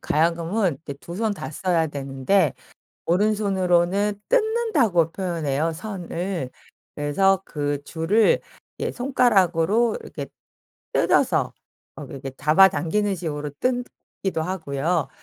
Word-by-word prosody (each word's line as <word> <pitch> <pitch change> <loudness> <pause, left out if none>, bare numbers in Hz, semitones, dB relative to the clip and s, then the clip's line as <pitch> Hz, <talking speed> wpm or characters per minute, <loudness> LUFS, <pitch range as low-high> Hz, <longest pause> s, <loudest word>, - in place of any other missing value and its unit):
가야금은 170 +1 +1
이제 140 - -6
두 155 +5 -11
손 220 +1 0
다 200 - -6
써야 170 -1 +1
되는데 140 +3 0 0.5
오른손으로는 195 0 +2 0.2
뜯는다고 430 - +2
표현해요, 165 -4 -1
선을. 180 -5 -4 0.5
그래서 190 +7 +2
그 145 -1 -3
줄을 170 +9 +2 0.4
이제 - - -3
손가락으로 220 - +2
이렇게 140 -3 -7 0.7
뜯어서 - - +2 0.4
어 - - -8
이렇게 135 0 -7
잡아당기는 190 +5 +3
식으로 150 -4 -4
뜯기도 245 -8 -3
하고요. 165 -2 -1
175 Hz, 265 characters per minute, -23 LUFS, 155-205 Hz, 0.7 s, 잡아당기는